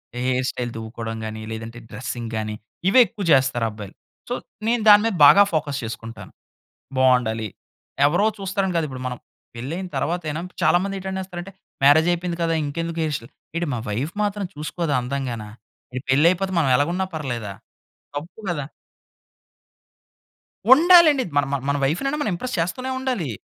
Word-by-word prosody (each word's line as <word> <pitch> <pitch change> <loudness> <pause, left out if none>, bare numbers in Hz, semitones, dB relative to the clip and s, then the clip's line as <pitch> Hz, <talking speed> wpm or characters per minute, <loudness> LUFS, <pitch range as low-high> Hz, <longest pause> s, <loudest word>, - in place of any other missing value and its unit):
Hair 125 +1 0
style 120 -1 -4
దువ్వుకోవడం 115 0 -5
గాని, 110 0 -6
లేదంటే 115 +1 -7
dressing 115 0 -5
గాని 105 0 -3 0.3
ఇవే 255 +6 +6
ఎక్కువ 205 - -7
చేస్తారు 130 -3 +2
అబ్బాయిలు. 105 -2 -10 0.3
సో - - -1 0.3
నేను 235 -1 +2
దాని 205 0 +9
మీద 225 - 0
బాగా 200 +8 +9
ఫోకస్ 150 -3 -1
చేసుకుంటాను. 115 0 -7 0.7
బావుండాలి. 120 -4 +3 0.6
ఎవరో 175 +8 +3
చూస్తారని 195 -1 -1
కాదు. 165 - +1
ఇప్పుడు 130 -1 -7
మనం 125 -1 -4 0.4
పెళ్ళయిన 165 +10 -4
తరువాత 175 +1 -1
అయినా 155 +3 -3 0.2
చాలా - - +5
మంది 195 0 -3
ఏటనేస్తారంటే 190 -1 -5 0.3
మ్యారేజ్ 155 +4 +6
అయిపోయింది 175 0 -2
కదా! 165 - +1
ఇంకెందుకు 165 +3 -4
హెయిర్ 155 -1 -1
స్టైల్. 115 - -14 0.2
యేటి 170 -1 -1
మా 120 - -2
వైఫ్ 130 +10 -2
మాత్రం 205 -1 -1
చూసుకోదా 150 +1 -3
అందంగానా. 125 -4 -4 0.4
యేటి 130 +1 -5
పెళ్ళైపోతే 175 +7 +3
మనం 140 -5 +2
ఎలాగున్నా 175 +7 0
పర్లేదా. 120 -9 -4 0.6
తప్పు 165 +9 -7
కదా! 145 -5 -2 2.1
ఉండాలండి. 320 -3 +7
మన 145 - +4 0.2
మన 140 - +2
వైఫ్‌నన్న 275 - 0
మనం 215 - 0
ఇంప్రెస్ 250 +8 -4
చేస్తూనే 255 +10 -2
ఉండాలి. 250 - -2
150 Hz, 145 wpm, -23 LUFS, 125-190 Hz, 2.1 s, దాని